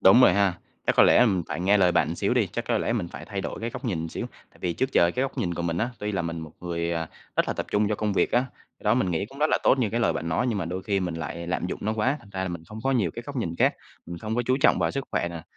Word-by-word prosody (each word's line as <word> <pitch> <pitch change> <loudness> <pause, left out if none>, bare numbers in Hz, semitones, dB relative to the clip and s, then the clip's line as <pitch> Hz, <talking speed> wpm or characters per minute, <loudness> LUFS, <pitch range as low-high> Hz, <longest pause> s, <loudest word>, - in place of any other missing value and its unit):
đúng 95 +6 +7
rồi 110 - +7
ha, 100 -2 +3 0.3
chắc - - +2
có - - +8
lẽ, - - +6
ừm, 100 -7 +4
phải - - -3
nghe 100 +3 +4
lời 90 -2 +4
bạn 80 - +3
một 85 - -3
xíu 100 +6 +1
đi, 120 -5 +3
chắc 120 - -2
có 115 -2 +2
lẽ - - 0
mình 105 -7 -1
phải 75 -1 -9
thay 100 +2 -4
đổi - - -5
cái 115 +1 -2
góc - - -8
nhìn 85 -8 -2
xíu, - - -4 0.2
tại - - -22
vì 90 - 0
trước 130 +10 -1
giờ 85 - +5
cái 125 - -1
góc 135 0 -3
nhìn 90 -8 -1
của 85 - -3
mình 85 0 -1
á, 120 +5 0
tuy 105 0 -3
là 95 -3 0
mình 85 0 -4
một 80 -1 -9
người, 85 -1 -2
à, 80 -1 -2 0.3
rất - - +2
là - - +1
tập - - -3
trung 105 0 +3
cho 105 - +1
công 105 0 -1
việc - - +1
á, 120 - +5 0.4
cái - - -21
đó 105 +1 +4
mình 105 -7 +1
nghĩ 85 +4 -1
cũng 135 - -13
rất 150 - +4
là - - +3
tốt 135 - +4
như 115 -5 +1
cái 115 - 0
lời 115 - +3
bạn 80 +4 -3
nói. 85 +10 +1
Nhưng 115 -5 0
mà 95 - -1
đôi 90 +3 -4
khi 100 -1 0
mình 90 -2 -2
lại 85 +1 -5
lạm 90 0 -1
dụng - - -4
nó 110 - 0
quá, 125 +6 +1
thành 105 - -17
ra 95 -1 -2
là 95 - -2
mình 85 -2 -5
không 110 +6 -9
có 135 - +2
nhiều 105 -10 +2
cái 120 - -5
góc 140 - -6
nhìn 85 -9 -2
khác, - - +3 0.3
mình 85 0 -6
không 110 +5 -3
có 120 - +1
chú 130 - +3
trọng - - +5
vào - - +1
sức 140 -1 -3
khỏe 85 - 0
nè, 85 -1 -7
100 Hz, 355 wpm, -26 LUFS, 85-115 Hz, 0.4 s, có